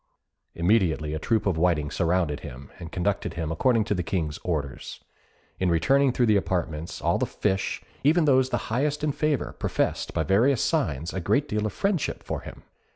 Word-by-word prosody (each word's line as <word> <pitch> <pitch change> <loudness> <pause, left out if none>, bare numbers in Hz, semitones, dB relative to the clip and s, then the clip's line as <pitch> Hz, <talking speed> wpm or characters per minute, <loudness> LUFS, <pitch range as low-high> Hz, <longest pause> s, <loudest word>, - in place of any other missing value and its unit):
Immediately 85 -5 +2
a 80 - -2
troop 110 +6 0
of 90 -5 +1
whiting 80 -4 +1
surrounded 85 -4 0
him, 70 -1 -10
and 85 -2 -8
conducted 100 +2 -1
him 80 -2 -3
according 115 +7 +2
to 105 - -1
the 90 - -1
King's 80 -3 -2
orders. 75 -6 -4 0.6
In 95 - +1
returning 135 +11 +3
through 125 0 +2
the 105 -2 +4
apartments 85 -4 -3
all - - +2
the - - 0
fish, 95 -2 -1 0.2
even 155 +3 +4
those 130 -2 +4
the - - -3
highest 145 +4 0
in 150 - +2
favour, 150 -2 -1
professed, - - -1
by - - +1
various 115 +7 +3
signs, 85 - -1
a 95 - -2
great 110 - +1
deal 105 0 -1
of - - -6
friendship 195 -5 -1
for - - -3
him. - - -11
95 Hz, 185 wpm, -26 LUFS, 80-130 Hz, 0.6 s, the